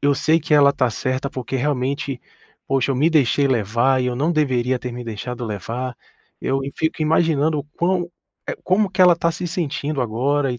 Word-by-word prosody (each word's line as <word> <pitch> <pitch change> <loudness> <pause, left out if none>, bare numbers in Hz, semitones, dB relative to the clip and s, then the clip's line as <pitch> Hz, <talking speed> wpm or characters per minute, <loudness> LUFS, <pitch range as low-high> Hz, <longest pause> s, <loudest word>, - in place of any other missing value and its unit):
Eu 145 0 +3
sei 160 +4 +2
que 155 - -4
ela 140 -1 +6
está 130 -3 +1
certa, 130 +4 -2
porque 130 +1 -4
realmente, 135 0 -2 0.5
poxa, 135 0 +1
eu 135 - 0
me 150 +6 +3
deixei 145 -2 +3
levar, 120 +2 +2
e 125 - -1
eu 125 - -2
não 150 +6 +1
deveria 130 -5 +1
ter 125 0 -6
me 120 0 -7
deixado 120 +2 -5
levar. 115 +4 -4 0.4
Eu 135 +1 0
e 140 - -6
fico 160 0 -1
imaginando 155 -1 +2
o 145 - -4
quão 175 0 0 0.4
eh, - - -2
como 190 +2 +2
que 185 - -3
ela 180 -1 +8
está 170 0 0
se 180 +2 -4
sentindo 155 -4 -2
agora, 130 +4 0
e 120 - -6
140 Hz, 205 wpm, -21 LUFS, 125-155 Hz, 0.5 s, ela